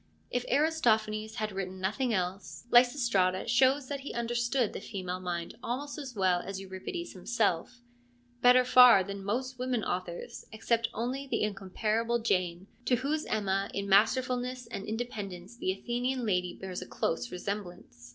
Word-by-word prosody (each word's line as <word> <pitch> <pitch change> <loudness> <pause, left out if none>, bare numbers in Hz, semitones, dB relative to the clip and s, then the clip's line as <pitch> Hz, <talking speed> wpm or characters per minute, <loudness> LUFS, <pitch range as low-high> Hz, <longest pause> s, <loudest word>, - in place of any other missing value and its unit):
If 245 0 -1
Aristophanes 220 -8 +2
had 215 -2 -2
written 190 -1 -5
nothing 220 +7 0
else, 185 -1 -3
Lysistrata 235 -7 +4
shows 260 +3 +3
that 280 0 -3
he 275 - -7
understood 240 0 0
the - - -6
female 185 -4 -5
mind 175 +3 -4
almost 285 +6 -4
as 265 -4 -7
well 185 -3 +2
as 195 -1 -6
Euripides 195 - -6
himself: 215 +3 -1 0.6
better 250 +1 +6
far 250 -5 +8
than 200 +1 -6
most 250 +5 -2
women 250 -3 -1
authors, 180 -1 -4
except 230 +1 0
only 255 +5 -3
the - - 0
incomparable 215 +3 0
Jane, 185 -5 0 0.2
to 250 - +3
whose 290 +5 -2
Emma 195 -2 0
in 200 0 -2
masterfulness 250 +4 +2
and 230 -4 -6
independence 210 -3 -5
the 185 - 0
Athenian 245 +5 -2
lady 180 -4 0
bears 185 -2 -6
a 180 - -7
close 200 +9 -2
resemblance. 180 - -6
220 Hz, 150 wpm, -30 LUFS, 190-250 Hz, 0.6 s, far